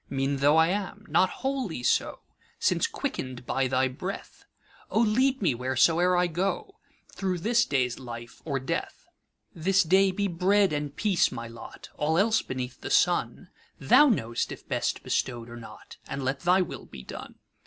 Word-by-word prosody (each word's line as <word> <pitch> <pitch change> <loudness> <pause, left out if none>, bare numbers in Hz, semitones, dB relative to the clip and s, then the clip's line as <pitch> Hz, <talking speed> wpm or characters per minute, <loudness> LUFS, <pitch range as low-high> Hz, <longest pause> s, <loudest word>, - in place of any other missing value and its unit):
Mean 135 +1 -1
tho' 145 +3 +4
I 160 +1 +5
am, 205 +2 -3
not 185 - +3 0.2
wholly 255 - -2
so, - - +1 0.4
Since - - +1
quicken'd 130 -1 -5
by 135 +1 0
thy 130 +1 +2
breath;O 185 +8 -7
lead 250 +3 +2
me, 165 - +3
whereso'er 160 +9 +2
I 180 - +3
go, 195 - -3 0.3
Thro' 185 -2 -2
this 230 +6 +2
day's 125 -3 0
life 120 -2 -9
or 140 -4 -2
death! 130 - -4 0.5
This 195 +4 +2
day 190 +3 +4
be 200 +2 -1
bread 190 +1 +2
and 145 -1 -3
peace 200 -5 +2
my 115 0 -6
lot:All 150 +6 -4
else 220 +4 +3
beneath 130 -1 -6
the - - -5
sunThou 260 - +2
know'st 120 - -1
if - - -10
best - - -2
bestow'd 120 -2 -2
or 120 - -8
not, 115 - -12
And 140 - -4
let 135 +1 -1
thy 180 +3 +3
will 180 - -5
be 65 - -11
done. - - -9
165 Hz, 160 wpm, -27 LUFS, 130-195 Hz, 0.5 s, I